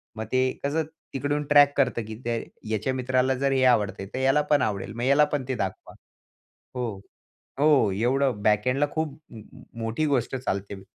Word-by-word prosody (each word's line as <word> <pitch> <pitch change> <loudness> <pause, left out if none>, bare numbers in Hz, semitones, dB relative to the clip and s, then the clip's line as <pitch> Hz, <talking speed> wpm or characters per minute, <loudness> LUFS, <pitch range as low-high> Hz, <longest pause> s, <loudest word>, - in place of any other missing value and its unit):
मग 110 - -4
ते 130 - +3 0.2
कसं 150 +3 0 0.3
तिकडून 145 +2 -1
ट्रॅक 145 -1 +5
करतं 130 -4 +2
की 110 - -6
ते 120 - 0 0.4
याच्या 110 +4 -1
मित्राला 130 0 +1
जर 140 - +2
हे 135 -1 +2
आवडत 100 -2 -3
तर 130 - -3
याला 135 +3 +3
पण 145 -2 +5
आवडेल. 100 -2 -2
मग 120 - -6
ह्याला 140 +3 +5
पण 145 -2 0
ते 130 - -1
दाखवा. 95 -4 -5 0.8
हो. 120 -5 -3 0.6
हो, 145 -8 +4
एवढं 120 +3 0
बॅकएण्डला 125 +7 +2
खूप 155 -2 -3 0.6
मोठी 115 +7 -1
गोष्ट 135 -3 0
चालते 100 -6 -4
130 Hz, 165 wpm, -25 LUFS, 110-140 Hz, 0.8 s, ट्रॅक